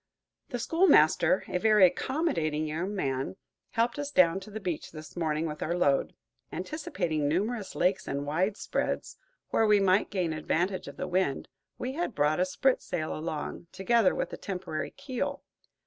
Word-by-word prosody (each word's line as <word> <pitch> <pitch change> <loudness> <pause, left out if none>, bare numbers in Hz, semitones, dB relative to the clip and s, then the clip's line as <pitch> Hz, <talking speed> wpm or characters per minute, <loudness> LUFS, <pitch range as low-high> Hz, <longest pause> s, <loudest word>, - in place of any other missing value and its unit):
The 245 - -2
schoolmaster, 265 - +4
a 180 - -1
very 215 -1 +6
accommodating 170 - 0
young 170 +7 -3
man, 135 -3 -2 0.4
helped 235 +3 +1
us 290 -1 -2
down 185 -8 +4
to 195 - -11
the 215 +1 -6
beach 180 -6 -4
this 155 -1 -10
morning 160 -2 0
with 150 -1 -5
our 170 +2 -1
load. 140 -6 +2 0.4
Anticipating 175 - -2
numerous 205 +7 -1
lakes 185 +2 +1
and 140 +1 -2
widespreads, 185 +8 -1 0.3
where 225 - +3
we 210 -1 +5
might 195 +1 +3
gain 180 -5 -1
advantage 175 +4 -1
of - - -9
the - - -3
wind, 180 -6 0 0.3
we 250 - -3
had 320 - -2
brought 150 +3 +2
a 180 - +3
sprit 255 +8 +1
sail 155 -3 -3
along, 155 +1 -5
together 225 +1 +3
with - - -3
a - - -4
temporary 180 -5 -4
keel. 270 -3 -4
185 Hz, 165 wpm, -29 LUFS, 155-220 Hz, 0.4 s, very